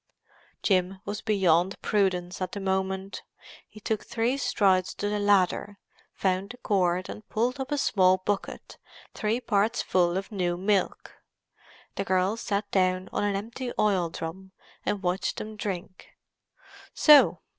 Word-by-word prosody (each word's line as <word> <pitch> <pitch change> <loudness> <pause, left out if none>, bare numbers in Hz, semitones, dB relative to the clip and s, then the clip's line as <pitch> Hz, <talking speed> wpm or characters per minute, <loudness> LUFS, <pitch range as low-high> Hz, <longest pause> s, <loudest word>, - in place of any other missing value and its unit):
Jim 190 -1 +1
was 205 +1 -4
beyond 190 -3 +2
prudence 185 -3 0
at 185 -1 -3
the 200 - -4
moment. 190 0 -2 0.5
He 215 - -13
took 215 0 -2
three 235 +3 -1
strides 190 -8 +1
to 205 - -2
the 210 0 -1
ladder, 205 0 +2 0.4
found 190 +1 0
the 245 - -9
cord, 185 -5 0
and 210 - -10
pulled 245 +5 -1
up 265 +2 -4
a 290 - +1
small 185 -8 +3
bucket, 195 +2 -4 0.3
three 220 +3 -1
parts 220 -1 +1
full 175 -1 +2
of 195 +2 -5
new 175 -4 -1
milk. 195 +1 -1 0.8
The 195 - 0
girl 190 +2 +1
sat 205 -2 -3
down 185 -1 +1
on - - 0
an 205 -1 0
empty 235 +5 -5
oil 190 -5 +2
drum 190 +4 -7 0.3
and 205 -2 -2
watched 180 +2 -1
them 215 0 -6
drink. 190 -2 -6 0.9
"So! 300 -2 +6
195 Hz, 145 wpm, -27 LUFS, 185-210 Hz, 0.9 s, So